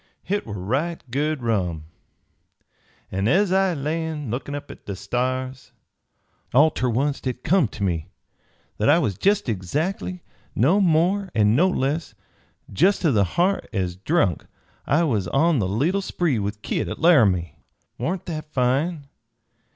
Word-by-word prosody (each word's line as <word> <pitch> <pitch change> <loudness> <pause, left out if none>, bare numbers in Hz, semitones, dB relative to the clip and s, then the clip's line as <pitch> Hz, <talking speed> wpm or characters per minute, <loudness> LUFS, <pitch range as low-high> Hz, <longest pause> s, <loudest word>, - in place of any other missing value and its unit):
Hit 205 -4 -2
war 105 - -5
right 135 - -2
good 145 0 -1
rum, 90 -9 -1 1.3
an 95 +2 -1
ez 190 - +3
I 190 -2 +2
lay 160 +3 -2
lookin' 140 0 -4
up 145 - -7
at - - -15
the 100 - -4
stars, 130 +4 -3 0.8
all 155 +4 +6
ter 125 - -1
oncet 135 +5 -1
hit 125 -1 -3
come 180 -5 +3
ter 105 - -6
me 85 -4 -2 0.7
that 105 - +3
I 155 - +6
was 125 - 0
jest 200 - +1
exactly, 155 - -2 0.3
no 165 - +3
more 185 +3 +2
an' 105 0 +4
no 175 +8 +4
less, 145 -5 -2 0.6
jest 190 - +3
ter 160 - +4
the 105 -5 +3
ha'r, 185 +3 +3
ez 90 -5 -2
drunk 100 - 0 0.4
I 150 +6 +3
was 110 - 0
on 155 - +2
the 95 - 0
leetle 155 - +1
spree 170 - 0
with 105 +1 -4
Kit - - -1
at - - -5
Laramie. 105 - +3 0.4
Warn't 180 +1 -2
that 155 -2 -6
fine? 140 +4 0
140 Hz, 150 wpm, -23 LUFS, 110-170 Hz, 1.3 s, all